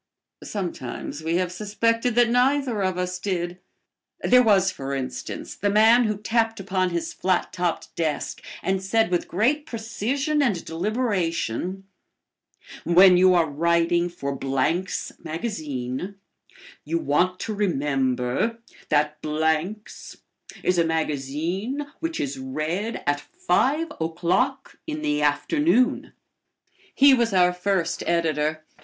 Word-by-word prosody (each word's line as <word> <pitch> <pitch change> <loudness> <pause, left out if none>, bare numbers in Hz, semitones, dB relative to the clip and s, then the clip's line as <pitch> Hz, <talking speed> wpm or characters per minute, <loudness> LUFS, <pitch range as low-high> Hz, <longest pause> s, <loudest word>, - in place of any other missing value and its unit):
Sometimes 160 - -5
we 165 +1 0
have 180 0 0
suspected 230 +4 0
that 240 -1 +5
neither 250 -2 +2
of 185 -1 0
us 180 0 -2
did. 180 -2 -3 0.6
There 250 0 +5
was, 195 -5 +4
for 140 -4 -5
instance, 130 -2 -5
the 205 - -1
man 220 +4 +5
who 215 -2 -1
tapped 225 +1 0
upon 190 -1 0
his 170 -1 -3
flat 185 -1 0
topped 175 -2 -2
desk 160 -3 -2 0.2
and 190 0 0
said 195 0 +1
with 175 - 0
great 275 - +1
precision 255 +7 -1
and 205 -11 0
deliberation, 185 - -2 1.0
"When 180 +2 +7
you 185 0 +5
are 170 -2 +4
writing 170 +3 +1
for 140 -5 -4
Blank's 135 +8 -1
Magazine, 155 - -4 0.7
you 165 +3 -1
want 175 +4 +1
to 220 - -3
remember 135 - 0 0.3
that 150 0 +1
Blank's 160 +7 -2 0.5
is 180 -1 +2
a - - +5
magazine 160 - -2
which 330 0 -3
is 135 -1 -3
read 155 - -3
at 145 0 +1
five 330 - 0
o'clock 185 +12 -1
in 305 -1 -4
the 150 0 0
afternoon." 250 - +2 0.8
He 275 0 +7
was 235 -4 +2
our 180 -1 +4
first 180 -2 -1
editor. 155 -2 0
180 Hz, 125 wpm, -24 LUFS, 160-225 Hz, 1.0 s, When